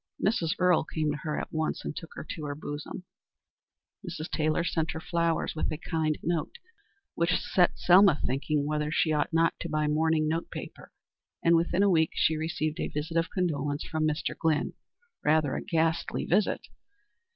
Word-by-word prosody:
Mrs. 180 -6 +1
Earle 180 -2 +4
came 155 -1 -1
to 145 - -3
her 150 0 -3
at - - -6
once, 160 0 -2
and - - -4
took 165 - -7
her - - -7
to 155 - -5
her 145 -1 -3
bosom; 145 +4 -6 1.0
Mrs. 170 -3 -6
Taylor 155 +1 +1
sent 165 -1 -1
her 160 - -4
flowers 170 0 0
with 155 - -1
a 155 - -3
kind 160 -2 -1
note, 170 - -1 0.6
which 170 +1 +1
set 180 -2 +2
Selma 180 -3 +6
thinking 145 +3 0
whether 150 0 -1
she 155 0 +2
ought 150 -1 0
not 165 0 +3
to 170 - -4
buy 155 0 0
mourning 155 +1 +2
note 165 +2 -1
paper; - - -9 0.5
and 170 0 +5
within 170 +3 +2
a 200 - +4
week 160 -2 +3
she 160 - +3
received 155 -1 -2
a - - -1
visit 150 +3 -4
of 165 +1 +2
condolence 145 -5 -1
from 155 -1 -1
Mr. 155 0 -2
Glynn, 160 -2 0 0.5
rather 150 -2 +3
a - - -2
ghastly 165 -1 0
visit. 195 +3 +2
160 Hz, 180 wpm, -28 LUFS, 155-170 Hz, 1.0 s, Selma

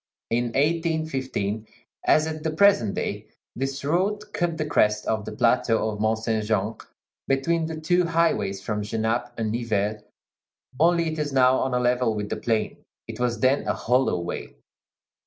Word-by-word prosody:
In 120 +1 +2
1815, 135 - -1 0.4
as 155 - +4
at 155 -1 -4
the 160 - -1
present 155 - +3
day, - - -3 0.3
this 135 +2 -3
road 205 +7 0
cut 170 -2 -1
the 155 - -1
crest 105 -7 +2
of 110 -1 -1
the - - -5
plateau 115 0 +2
of 105 - -7
Mont 110 +1 +1
Saint 110 -1 -1
Jean 105 0 0 0.5
between 160 +5 +1
the 160 -1 -5
two 175 +3 +2
highways 165 -12 +1
from 105 0 -2
Genappe 110 +3 -1
and 110 -2 -1
Nivelles; 105 -2 -1 0.8
only, 170 +1 +3
it 155 - -5
is 150 -1 -1
now 130 -1 +4
on 130 -1 0
a - - +2
level 125 -2 +1
with 105 -1 -4
the - - -2
plain; 110 -2 -1 0.3
it - - -7
was 120 -3 -1
then 130 +2 +2
a - - +1
hollow 125 -6 +1
way. 85 -7 -6
125 Hz, 170 wpm, -25 LUFS, 110-160 Hz, 0.8 s, as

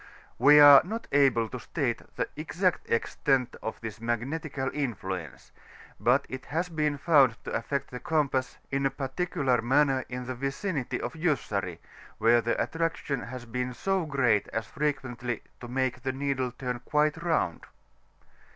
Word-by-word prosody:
We 145 +4 +8
are 145 -1 +10
not 225 +6 -5
able 135 -5 +4
to - - -6
state - - -2 0.2
tne - - +1
exact 175 +4 -1
extent 125 +2 +1
of 110 - -5
this 110 -1 -7
magnetical 135 +4 -2
influence; 95 - -4 0.5
but 130 +4 +3
it 130 0 -7
has 170 +4 -1
been 150 -3 0
found 140 -7 +4
to - - -6
afiect 140 +4 -2
tiie 125 - -7
compass 150 -6 0
in 135 0 +1
a - - -1
particular 135 -1 -1
manner 135 +2 +3
in 125 0 -5
the 130 - -3
vicinity 135 +3 -3
of - - -4
Jussari, 110 - -1 0.4
where 120 +1 +4
the 115 +1 -1
attraction 165 -4 -1
has 125 0 -7
been 125 +1 -3
so 190 0 0
creat 125 -8 +2
as 110 -1 -3
frequentiy 130 -4 -3 0.2
to 120 - -8
make 130 0 -1
the 130 +1 -2
needle 135 -2 -1
turn 125 0 -4
quite 150 +5 +1
round. 160 - 0
135 Hz, 150 wpm, -28 LUFS, 120-150 Hz, 0.5 s, are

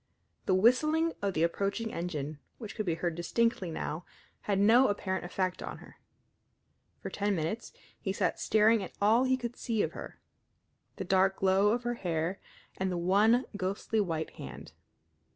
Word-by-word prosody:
The 185 - +4
whistling 305 - +3
of 200 -2 -1
the 160 - +2
approaching 200 +6 -1
engine, 155 -4 -4 0.2
which 215 -4 -7
could 215 -4 -3
be 165 - +1
heard 170 0 -2
distinctly 190 +3 0
now, 160 +1 -4 0.4
had 200 -2 0
no 225 +6 +6
apparent 190 -3 -2
effect 185 0 -2
on - - -6
her. - - -15 1.1
For - - -5
ten 205 0 0
minutes 170 +8 -3 0.3
he 190 - -2
sat 195 - 0
staring 220 +1 +4
at 190 - -7
all 225 +5 +4
he 260 0 +2
could 240 -1 -5
see 225 -3 -1
of - - -2
her - - -9 0.8
the - - -4
dark 190 0 +3
glow 195 +1 +3
of 240 +3 0
her 240 0 -1
hair 175 -3 -2 0.4
and 190 0 0
the 180 - -1
one 210 +8 +4
ghostly 200 +3 -1
white 165 -5 -2
hand. - - -9
195 Hz, 170 wpm, -30 LUFS, 180-225 Hz, 1.1 s, no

